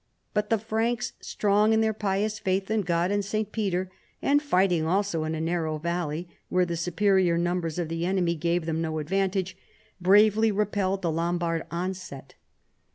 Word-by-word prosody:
But 210 0 0
the 225 - +3
Franks, 225 +3 -1
strong 210 +1 +2
in 220 - +3
their 220 0 +2
pious 210 +1 -1
faitli 190 +2 -1
in 220 - +2
God 175 0 0
and 205 0 +1
St. 215 +1 -2
Peter, 190 -4 -1 0.3
and 290 +1 +3
fighting 185 - +2
also 185 -3 0
in 160 +1 -2
a - - -4
narrow 160 -1 -1
valley, 170 0 -3 0.2
where 180 0 +2
the 170 -1 -3
superior 180 +1 +2
numbers 175 -2 -1
of 175 -2 -1
the 165 +1 -3
enemy 180 -3 +1
gave 170 +1 -1
them 160 0 -1
no 160 -1 -2
advantage, 190 +3 -1 0.5
bravely 210 +4 +5
repelled 195 -2 0
the 170 - +1
Lombard 170 0 -1
onset. 175 -6 -5
185 Hz, 165 wpm, -26 LUFS, 170-205 Hz, 0.5 s, bravely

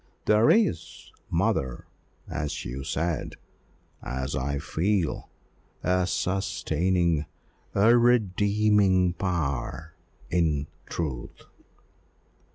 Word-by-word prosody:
There 105 +2 +4
is, 215 -6 +1 0.2
mother, 65 -2 0 0.4
as 75 -1 -4
you 65 +3 -5
said 80 +3 -2 0.7
as 65 +1 -3
I 70 +2 -1
feel, 85 +4 -1 0.5
a 90 0 +2
sustaining 85 -3 0 0.5
a 110 +4 +6
redeeming 105 -5 +3
power 80 -3 -3 0.4
in 80 -5 +1 0.2
truth." 70 -8 -5
85 Hz, 75 wpm, -26 LUFS, 75-100 Hz, 0.7 s, a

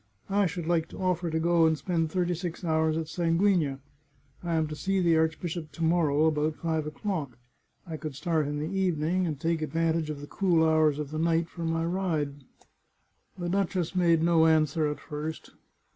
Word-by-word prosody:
I 200 -1 +3
should 175 -1 -5
like 165 -1 +1
to - - -10
offer 180 -2 0
to 160 0 -1
go 170 0 +4
and 160 -1 +1
spend 165 +1 -1
thirty 180 -1 0
six 175 +1 -5
hours 160 -1 +1
at 165 - -2
Sanguigna. 165 -3 +1 0.6
I 170 -1 -2
am 160 -1 +2
to 155 - -5
see 195 +5 0
the 170 -2 +3
archbishop 160 0 -1
to 165 - -4
morrow, 160 -3 +3
about 155 0 +1
five 160 -2 -2
o'clock. 150 - -4 0.5
I 165 -3 -6
could 155 -3 -6
start 155 +1 0
in 145 0 -3
the 150 - -2
evening, 180 -1 +1
and 150 -4 -4
take 165 0 0
ad 155 - -4
vantage 165 -1 +1
of 150 -2 -4
the 145 - -7
cool 170 -1 +2
hours 155 -2 +3
of 150 -1 -5
the 155 - -3
night 165 0 +1
for 170 -2 -6
my 165 0 0
ride." 160 -6 -2 0.9
The 175 -1 -4
duchess 185 -2 -1
made 170 -3 +3
no 165 -1 +4
answer 155 -1 +2
at 150 - -5
first. 155 +1 -6
165 Hz, 195 wpm, -28 LUFS, 155-175 Hz, 0.9 s, go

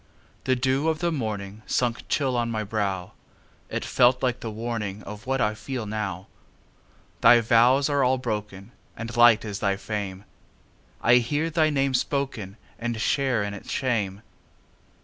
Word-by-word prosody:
The 130 - +3
dew 135 +4 +1
of 160 - 0
the 170 +1 0
morningSunk 110 -1 -2
chill 135 -4 +1
on 120 -1 0
my 110 -2 -2
brow; 100 -3 -2 0.6
It - - -3
felt 125 +1 +3
like 125 -1 +1
the 115 - -5
warningOf 105 -1 -5
what 135 0 0
I 105 -3 +2
feel 110 +2 -5
now. 100 -4 -4 1.0
Thy 120 +1 +8
vows 120 +4 +4
are 145 -2 +2
all 130 +1 +3
broken, 105 -4 -5 0.3
And 115 +1 -6
light 120 -2 +6
is 105 -1 -4
thy 100 -2 0
fame:I 105 +3 -3
hear 145 +7 0
thy 155 -1 +3
name 135 -2 +1
spokenAnd 120 -3 -3
share 130 -2 +1
in 100 0 -4
its 100 - -10
shame. 105 -6 -1
115 Hz, 145 wpm, -25 LUFS, 105-130 Hz, 1.0 s, Thy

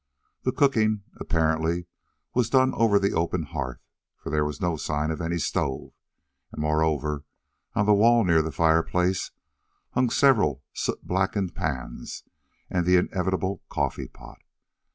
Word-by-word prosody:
The - - 0
cooking, 110 -7 +2 0.2
apparently, 80 +2 0 0.5
was 120 -3 +1
done 130 +1 +4
over 110 -3 +3
the 100 0 +1
open 85 +1 0
hearth, 70 -5 -5 0.3
for - - -7
there 75 0 +2
was 75 0 -4
no 90 -3 0
sign 75 +1 -2
of 80 - -4
any 85 +1 -1
stove, 70 -4 -2 0.6
and, - - -9
moreover, 75 -1 0 0.5
on 105 - +2
the 105 - +5
wall 115 +3 +5
near 85 -4 +4
the 80 0 -3
fireplace 85 +4 +1 0.6
hung 125 0 +2
several 110 - +3
soot - - -3
blackened 95 0 0
pans 70 -10 -5 0.4
and 90 -1 -1
the 90 - +5
inevitable 95 +1 -1
coffeepot. - - -4
85 Hz, 135 wpm, -26 LUFS, 75-100 Hz, 0.6 s, the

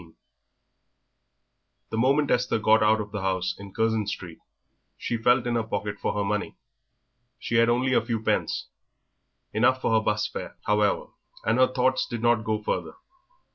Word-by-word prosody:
XIX 80 -2 -17 1.8
The 110 - -2
moment 140 +4 +2
Esther 125 -1 +1
got 110 0 +4
out 110 0 +4
of 105 -1 -5
the 105 -2 -4
house 95 -1 -1
in 100 -1 -10
Curzon 110 -1 0
Street 90 -5 -6 0.6
she 120 - -3
felt 120 +2 +3
in 120 - -1
her 120 - +1
pocket 105 -1 -4
for - - -1
her 105 - 0
money. 105 +1 -2 0.8
She 115 - -1
had 115 0 +4
only 125 +2 +1
a - - +4
few 115 -1 -2
pence; 110 - -1 0.9
enough 120 +4 +3
for 115 - 0
her 110 - +4
'bus 105 0 0
fare, - - -7
however, 105 -1 +1 0.4
and 115 +3 +2
her 130 0 +4
thoughts 130 0 +1
did 120 -1 -5
not 120 -2 +3
go 110 -1 -2
further. - - -2
110 Hz, 175 wpm, -26 LUFS, 105-120 Hz, 1.8 s, got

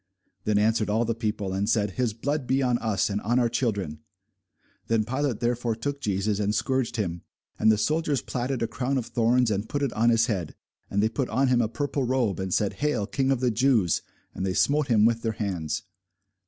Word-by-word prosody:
Then 105 -1 +2
answered 110 0 +2
all 110 +3 +2
the 115 - 0
people, 105 -4 -3
and 100 +2 -1
said, 105 -3 +1
His 120 +3 0
blood 145 +3 -2
be 135 +1 +2
on 125 -2 +2
us, 110 -4 0
and 105 0 -2
on 120 +4 +1
our 120 -2 +3
children. 100 - -2 0.9
Then 115 -2 +1
Pilate 130 -1 -1
therefore 120 -1 0
took 140 +5 -4
Jesus, 100 -1 0
and 105 0 0
scourged 130 -3 0
him. 85 -6 -2 0.4
And 110 +1 +5
the 110 - +3
soldiers 150 +5 0
platted 125 0 -2
a - - 0
crown 125 +4 -2
of 125 - -2
thorns, 120 0 +2
and 100 +1 -2
put 145 0 -1
it 135 - -1
on 115 +2 +3
his 115 -1 +4
head, 95 -9 -3 0.3
and 100 +1 +1
they - - +4
put 130 +2 -2
on 130 +3 +2
him 125 -1 +4
a 110 - 0
purple 145 +2 -2
robe, 125 -6 0
and 95 -1 -3
said, 100 +2 +1
Hail, 150 -8 +1
King 135 +5 -1
of 135 -2 +1
the 125 -2 +2
Jews! 115 - +2 0.3
and - - -4
they 95 -1 -1
smote 145 0 +2
him 110 -4 +4
with 115 0 +2
their 115 -1 -1
hands. 95 -8 -3
115 Hz, 220 wpm, -26 LUFS, 105-130 Hz, 0.9 s, And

